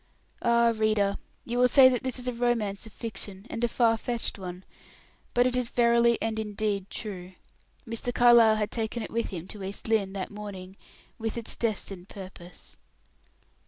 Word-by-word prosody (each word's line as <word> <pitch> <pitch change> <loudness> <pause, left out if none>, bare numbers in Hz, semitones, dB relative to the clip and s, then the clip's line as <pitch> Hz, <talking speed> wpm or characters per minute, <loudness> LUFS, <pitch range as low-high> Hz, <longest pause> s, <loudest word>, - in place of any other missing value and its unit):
Ah, 235 0 +4
reader! 215 -2 +1 0.3
You 240 +1 -2
will 250 - +6
say 265 +1 +8
that 250 -2 +1
this 260 -1 -3
is 250 0 -5
a 250 - 0
romance 230 -4 -1
of - - -13
fiction, 205 -3 -6
and 230 - -3
a - - +4
far 230 -1 +2
fetched 235 -2 -2
one, 180 0 -7 0.7
but 245 0 +5
it 250 0 +1
is 250 -2 0
verily 235 -1 +4
and 220 -1 -2
indeed 205 -2 -2
true. 185 -4 -6 0.5
Mr. 230 +2 -3
Carlyle 235 -2 +6
had 210 -1 -1
taken 225 0 -2
it - - -7
with 230 0 -1
him 180 -2 -6
to 205 -2 -8
East 195 +3 -5
Lynne, 210 -4 +1
that 195 0 -4
morning, 195 -3 -8 0.4
with 225 0 -3
its 230 - -4
destined 200 -5 -3
purpose. 185 -2 -11
220 Hz, 175 wpm, -28 LUFS, 200-235 Hz, 0.7 s, say